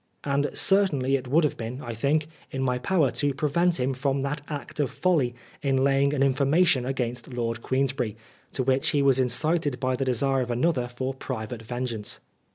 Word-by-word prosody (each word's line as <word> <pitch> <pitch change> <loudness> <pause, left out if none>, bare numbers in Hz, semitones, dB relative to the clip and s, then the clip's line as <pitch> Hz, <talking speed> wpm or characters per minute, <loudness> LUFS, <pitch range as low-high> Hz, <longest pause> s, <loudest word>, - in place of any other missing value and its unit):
And 140 0 +1
certainly 150 -10 +3
it 130 -1 -3
would 155 +6 +3
have 150 - 0
been, 115 +3 -5
I 120 -4 -6
think, 140 +7 +1 0.2
in 130 0 -3
my 125 -1 0
power 150 -1 +2
to 145 -2 -1
prevent 170 +4 +1
him 130 +2 0
from 135 +1 -1
that 145 +2 -2
act 150 0 -6
of 145 - +1
folly 150 -10 +1 0.3
in 135 -2 +1
laying 140 0 +3
an 140 -2 +1
information 140 0 +3
against 125 -2 -3
Lord 115 -1 -2
Queensberry, 130 -5 -1 0.4
to 130 - 0
which 130 +1 +2
he 145 -1 +2
was 135 -1 +4
incited 145 +2 +1
by 130 +1 0
the 135 - -2
desire 130 +2 +1
of 125 - -3
another 125 +1 +1
for 130 +2 -4
private 120 -3 -5
vengeance. 120 -2 -4
135 Hz, 185 wpm, -26 LUFS, 125-145 Hz, 0.4 s, was